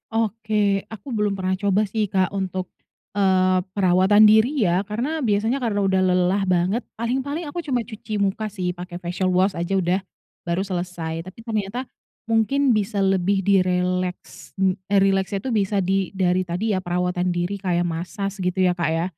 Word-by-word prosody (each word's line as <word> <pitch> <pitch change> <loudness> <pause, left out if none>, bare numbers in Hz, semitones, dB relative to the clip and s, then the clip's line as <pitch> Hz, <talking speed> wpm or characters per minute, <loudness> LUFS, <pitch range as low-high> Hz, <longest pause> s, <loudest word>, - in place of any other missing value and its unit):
Oke. 220 -1 -1 0.4
Aku 215 +2 -11
belum 210 -1 +1
pernah 185 0 0
coba 200 0 +3
sih, 220 -1 +1
Kak, 190 0 +1
untuk, 185 -1 -2 0.5
eee, 185 -2 +3
perawatan 190 +2 +4
diri 220 +4 +5 0.2
ya 175 +3 +2
karena 255 +9 -3
biasanya 215 +4 +1
kalau 205 -4 +1
udah 190 0 +2
lelah 180 +2 +2
banget 185 +7 +1 0.2
paling-paling 270 +7 -2
aku 345 +4 -5
cuma 255 -3 +1
cuci 215 -1 -5
muka 200 +2 0
sih 180 -1 -2
pakai 175 0 -7
facial 180 +1 -1
wash 185 +2 +2
aja 170 +2 -3
udah, 180 +1 +1 0.5
baru 185 +3 -1
selesai. 175 -3 -4
Tapi 185 +4 -12
ternyata 220 +4 -3 0.4
mungkin 240 +3 +2
bisa 205 0 -1
lebih 195 0 +2
direleks 180 -1 0
n 190 -1 +2 0.2
eee, 200 - +5
rileksnya 195 0 +1
tuh 260 - -1
bisa 200 +1 0
di 190 0 0
dari 185 -1 +1
tadi 185 +5 -1
ya - - 0
perawatan 180 0 -1
diri 175 +3 -1
kayak 175 -2 +1
massage 190 +4 -4
gitu 180 +1 -1
ya, - - +3
Kak 170 -2 0
ya. 165 - 0
190 Hz, 170 wpm, -23 LUFS, 180-210 Hz, 0.5 s, diri